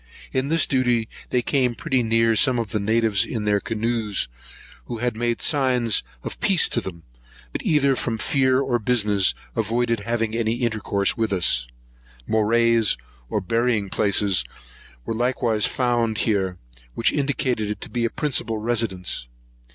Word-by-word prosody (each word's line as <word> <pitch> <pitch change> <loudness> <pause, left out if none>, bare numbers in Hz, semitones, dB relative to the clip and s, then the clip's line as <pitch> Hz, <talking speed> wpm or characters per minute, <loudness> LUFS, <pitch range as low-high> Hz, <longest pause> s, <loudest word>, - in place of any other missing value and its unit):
In 130 +1 0
this 165 +1 +3
duty 125 -4 +1 0.2
they 125 -1 +1
came 125 -4 +1
pretty 130 +1 0
near 115 0 +2
some 130 +2 +4
of 115 -4 -3
the 105 - 0
natives 110 -1 +2
in 110 -3 -4
their 105 -1 +2
canoes, 110 - -1 0.6
who 120 -2 -6
made 120 +1 -2
signs 125 -6 +2 0.2
of - - -6
peace 190 -4 +3
to 120 - 0
them; 85 -5 -8 0.5
but, - - -3
either 140 -3 +2
from 115 -2 -2
fear 130 +2 +2
or 130 -3 0
business, 105 -4 +2 0.2
avoided 115 +1 0
having 115 +1 -2
any 115 -1 0
intercourse 110 -4 0
with 110 -2 -1
us. 80 -10 +2 0.6
Morais, 115 +1 +3 0.5
or - - -1
burying 115 -1 0
places, 100 -2 +2 0.6
were - - -2
likewise 115 -2 +1
found 120 -3 0
here, 95 -5 0 0.4
which 115 - +1
indicated 130 -6 0
it 105 - -4
to - - -7
be 120 -1 -1
a 115 - +1
principal 120 -6 -1
residence. 105 - -1
115 Hz, 150 wpm, -23 LUFS, 105-125 Hz, 0.6 s, some